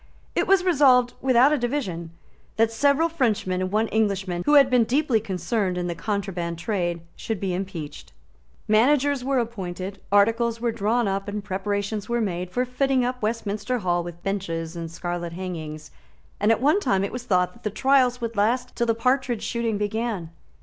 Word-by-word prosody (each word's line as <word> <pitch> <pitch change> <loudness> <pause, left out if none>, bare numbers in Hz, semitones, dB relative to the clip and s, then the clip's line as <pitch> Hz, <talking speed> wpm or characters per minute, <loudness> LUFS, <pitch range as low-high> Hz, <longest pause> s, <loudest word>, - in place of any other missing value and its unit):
It - - 0
was 385 -1 +4
resolved, 265 -8 +4
without 260 +2 +5
a 300 - +1
division, 230 - -2 0.5
that 225 0 +2
several 285 +7 +3
Frenchmen 220 - 0
and 185 0 -2
one 215 +2 +2
Englishman 195 -5 0
who 295 - +5
had 280 -2 +8
been 250 -2 +4
deeply 255 0 +2
concerned 195 -1 -2
in 180 - -2
the 175 - -2
contraband 175 -2 -3
trade 175 -2 -2
should 225 -4 -4
be 190 -1 -2
impeached. 175 -6 -6 0.6
Managers 270 +5 +3
were 270 +1 0
appointed; 195 -5 -4
articles 230 +3 +3
were 235 0 0
drawn 225 +1 0
up; 195 +1 -2
preparations 200 +2 -3
were 235 0 +1
made 180 -4 -2
for 250 +7 -1
fitting 255 0 +1
up 250 0 -3
Westminster 220 +2 -2
Hall 175 -5 0
with 175 0 -9
benches 170 -4 -3
and 165 -1 -5
scarlet 175 0 -4
hangings; 160 -4 -6 0.5
and 210 +2 +3
at 225 - +2
one 300 +8 +4
time 195 - +1
it 200 - -2
was 245 0 -6
thought 180 -5 +1
that 235 - -19
the 210 - -2
trials 255 +2 +3
would 230 -1 -4
last 245 +5 0
till 235 - 0
the 230 - +2
partridge 250 -1 0
shooting 230 -2 -1
began. 210 -4 -2
215 Hz, 175 wpm, -24 LUFS, 185-245 Hz, 0.6 s, had